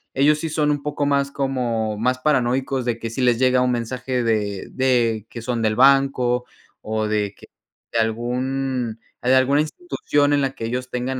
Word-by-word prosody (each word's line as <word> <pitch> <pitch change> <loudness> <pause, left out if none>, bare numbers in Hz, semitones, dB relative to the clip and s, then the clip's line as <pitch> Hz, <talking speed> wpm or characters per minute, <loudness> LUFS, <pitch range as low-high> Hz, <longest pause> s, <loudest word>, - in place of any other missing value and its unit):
ellos 150 +3 +4
sí 160 - -3
son 150 -1 +1
un 145 -1 -1
poco 145 0 -2
más 140 -1 +1
como 120 -6 -1
más 125 +4 +1
paranoicos 130 -1 +1
de 120 -1 -1
que 115 - -4
sí 125 - -3
les 125 -2 +3
llega 130 0 +3
un 125 0 +2
mensaje 125 +1 -2
de 105 -4 -1
de 120 -5 +1
que 115 - -8
son 120 -1 -2
del 110 -1 +1
banco 130 -1 +3 0.4
o 110 0 -2
de 105 -1 -1
que - - -15 0.5
de 115 - +2
algún 125 +1 -2 0.2
de 125 +1 +3
alguna 135 +3 +4
institución 150 - 0
en 145 - +3
la 135 -1 0
que 115 - -5
ellos 125 +2 -3
tengan, 130 +1 -3
125 Hz, 190 wpm, -22 LUFS, 115-135 Hz, 0.5 s, ellos